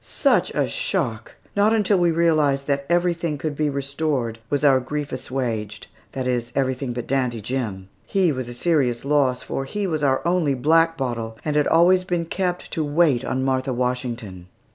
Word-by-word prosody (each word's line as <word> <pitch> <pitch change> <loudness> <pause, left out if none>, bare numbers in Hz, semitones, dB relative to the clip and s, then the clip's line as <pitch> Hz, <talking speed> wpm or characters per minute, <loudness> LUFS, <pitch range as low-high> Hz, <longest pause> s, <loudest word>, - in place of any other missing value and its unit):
Such - - +1
a - - +2
shock! - - -2 0.2
Not 205 +2 +4
until 205 -3 +2
we 175 -1 +3
realized 155 -4 +2
that 140 -1 -1
everything 170 -3 +1
could 150 0 -3
be 150 0 0
restored 140 -4 -2
was 145 0 0
our 135 -2 +6
grief 145 +3 -4
assuaged 120 -5 -4 0.3
that 130 -2 -3
is, 120 -2 -1
everything 130 -1 -1
but 120 -1 -4
Dandy 125 -3 0
Jim. 105 -5 -4 0.2
He 190 -4 +2
was 130 -3 -4
a 120 - -6
serious 130 -5 +1
loss, 140 -3 +2
for 135 - -3
he 205 +9 -3
was 160 -5 -1
our 135 -2 +1
only 170 -6 +2
black 165 +5 +3
bottle 115 -4 -3
and 150 -1 -1
had 150 -1 +3
always 180 +3 +5
been 175 -2 -1
kept 180 +1 -3
to 160 - -1
wait 145 -4 +2
on 130 0 -1
Martha 130 0 0
Washington. 120 -7 -3
140 Hz, 180 wpm, -23 LUFS, 125-165 Hz, 0.3 s, our